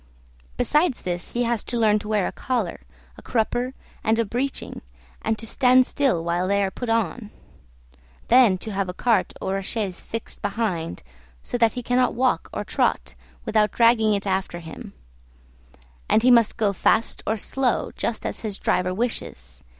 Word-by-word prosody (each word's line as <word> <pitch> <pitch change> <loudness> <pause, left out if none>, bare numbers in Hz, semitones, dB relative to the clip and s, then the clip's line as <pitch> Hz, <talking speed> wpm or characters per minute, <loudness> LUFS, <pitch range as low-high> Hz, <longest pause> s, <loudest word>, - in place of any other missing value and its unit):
Besides 300 -3 +1
this 175 -1 -4
he 245 - +1
has 235 -2 0
to 240 - -3
learn 215 -2 +3
to 210 - -9
wear 210 -3 +1
a - - -2
collar, 240 -9 -2 0.4
a - - -12
crupper, 245 +2 -1 0.3
and 220 +1 +2
a 230 - +1
breeching, 255 +6 -3 0.4
and 220 0 -1
to 225 - -6
stand 255 +2 +4
still 255 -14 +1
while 175 +2 0
they 200 +1 +2
are 190 - -1
put 245 +3 -5
on; 225 0 -1 1.0
then 235 -6 +6
to 215 +4 -7
have 195 -2 -2
a 180 - -5
cart 225 -5 +2
or 195 +1 -2
a - - -3
chaise 195 -2 -3
fixed 225 -1 -7
behind, 195 - -2 0.4
so - - -5
that 230 -2 +4
he 245 - -5
cannot 250 0 +2
walk 250 -9 +1
or - - -3
trot 65 +1 0 0.3
without 215 -1 +2
dragging 230 -2 +4
it 200 - -3
after 190 -2 -1
him; 175 +5 -9 1.2
and 220 - +4
he 255 - +6
must 235 -3 +4
go 205 -3 +1
fast 220 +4 +1
or 220 - +1
slow, 255 +3 -1
just 230 - -3
as - - -3
his 210 -3 -4
driver 185 0 0
wishes. 65 - -4
220 Hz, 175 wpm, -24 LUFS, 190-240 Hz, 1.2 s, then